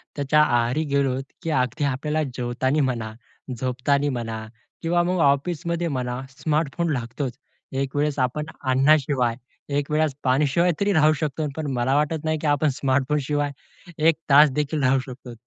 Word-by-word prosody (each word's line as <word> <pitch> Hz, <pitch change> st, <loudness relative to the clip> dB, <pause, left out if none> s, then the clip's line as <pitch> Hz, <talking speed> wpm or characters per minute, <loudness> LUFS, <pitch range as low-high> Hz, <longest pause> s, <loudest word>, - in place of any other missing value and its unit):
त्याच्या 145 Hz, +1 st, +3 dB
आहारी 120 Hz, +2 st, +1 dB
गेलोत, 135 Hz, -2 st, +1 dB, 0.2 s
की 165 Hz, -, -4 dB
अगदी 140 Hz, +1 st, 0 dB
आपल्याला 150 Hz, +3 st, 0 dB
जेवतांनी 130 Hz, +4 st, 0 dB
म्हणा, 110 Hz, -3 st, -4 dB, 0.4 s
झोपतांनी 130 Hz, +3 st, 0 dB
म्हणा 115 Hz, -4 st, -4 dB, 0.4 s
किंवा 175 Hz, +1 st, +2 dB
मग 180 Hz, +1 st, 0 dB
ऑफिसमध्ये 170 Hz, +4 st, -1 dB
म्हणा 125 Hz, -4 st, -3 dB
स्मार्टफोन 155 Hz, +3 st, -1 dB
लागतोच. 125 Hz, +1 st, -4 dB, 0.3 s
एक 135 Hz, 0 st, -3 dB
वेळेस 145 Hz, 0 st, 0 dB
आपण 130 Hz, +4 st, 0 dB, 0.2 s
अन्नाशिवाय, 130 Hz, -2 st, +2 dB, 0.4 s
एकवेळेस 150 Hz, +1 st, 0 dB
पाणीशिवाय 145 Hz, +6 st, +2 dB
तरी 200 Hz, 0 st, +2 dB
राहू 155 Hz, -2 st, +5 dB
शकतो. 155 Hz, 0 st, -2 dB
पण 155 Hz, -2 st, -3 dB
मला 125 Hz, +2 st, +1 dB
वाटत 150 Hz, +1 st, 0 dB
नाही 155 Hz, 0 st, 0 dB
की 155 Hz, -, -1 dB
आपण 145 Hz, +1 st, +2 dB
स्मार्टफोनशिवाय 140 Hz, +2 st, 0 dB, 0.6 s
1 165 Hz, -, +5 dB
तास 145 Hz, +2 st, +8 dB
देखील 150 Hz, 0 st, -1 dB
राहू 130 Hz, +1 st, +4 dB
शकतो. 130 Hz, -1 st, -10 dB
140 Hz, 145 wpm, -23 LUFS, 130-155 Hz, 0.6 s, तास